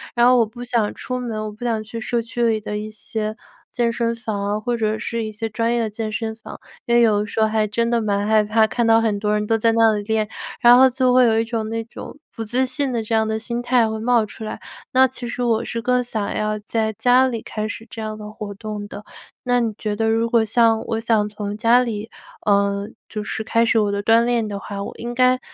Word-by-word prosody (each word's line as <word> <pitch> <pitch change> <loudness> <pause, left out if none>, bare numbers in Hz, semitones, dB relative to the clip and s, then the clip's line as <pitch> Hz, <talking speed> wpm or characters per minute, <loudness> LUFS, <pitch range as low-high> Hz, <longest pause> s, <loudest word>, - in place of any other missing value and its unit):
然 240 0 +4
后 250 0 +6
我 230 - +4
不 240 +3 -9
想 235 -4 0
出 255 0 -4
门， 235 -3 -4
我 215 - -5
不 210 +3 -11
想 225 -3 -1
去 225 +2 -7
社 235 +2 -1
区 235 +1 -3
里 220 -1 +1
的 210 0 -4
一 215 +1 -6
些， 215 0 -4 0.4
健 235 -1 0
身 235 0 -1
房 220 -3 -4
啊， 205 +1 -1
或 240 +3 -1
者 220 -1 0
是 230 +1 -3
一 215 - -4
些 225 +2 -4
专 230 +2 0
业 240 - +1
的 225 - -1
健 215 +1 -4
身 220 0 -3
房。 220 - -11 0.3
因 235 - +3
为 240 - +6
有 215 -3 +4
的 210 - -1
时 220 - -4
候 220 - +4
还 215 0 +1
真 230 +3 0
的 235 -1 +2
蛮 205 -1 0
害 215 0 +4
怕， 220 +1 +3
看 235 +2 0
到 225 0 +6
很 220 -2 +1
多 210 0 0
人 210 0 0
都 225 - +2
在 225 +1 +3
那 225 -1 +4
里 205 - -2
练， 215 0 0 0.3
然 240 0 +8
后 260 +1 +7
就 255 0 +2
会 255 0 +6
有 225 -1 +3
一 225 - 0
种 225 -2 -3
那 225 0 -2
种 230 - -10 0.2
不 225 - -4
自 245 +4 0
信 275 +1 -2
的 235 -2 -1
这 220 - -4
样 220 0 +2
的 220 0 -1
心 235 +2 -4
态 245 -2 +3
会 220 0 -4
冒 235 0 +2
出 215 - -10
来。 215 - -5 0.3
那 260 +1 +6
其 255 -1 -7
实 245 +1 -3
我 230 -1 +1
是 235 - -4
更 250 0 +2
想 220 -4 -3
要 215 0 -1
在 220 +1 -1
家 250 +4 +4
里 235 -3 -4
开 215 0 -4
始 225 0 -7
这 225 - -8
样 215 0 -4
的 210 0 -8
活 210 -1 -7
动 210 0 -6
的。 205 0 -10 0.4
那 245 0 +2
你 230 -2 -1
觉 210 -1 -2
得， 225 +1 0
如 225 +1 +2
果 230 -1 +3
像 225 0 +3
我 225 -1 -1
想 225 -2 +1
从 205 -1 -5
家 230 +3 +4
里， 225 -3 -4 0.4
呃， 200 0 +2 0.2
就 215 -1 -5
是 220 - -3
开 230 +1 +2
始 230 0 +2
我 205 -1 +1
的 200 0 -2
锻 225 +2 +5
炼 235 -2 +1
的 200 -1 -5
话， 200 0 -6
我 - - -6
应 240 +1 -5
该 255 +1 +3
225 Hz, 285 characters per minute, -21 LUFS, 215-235 Hz, 0.4 s, 然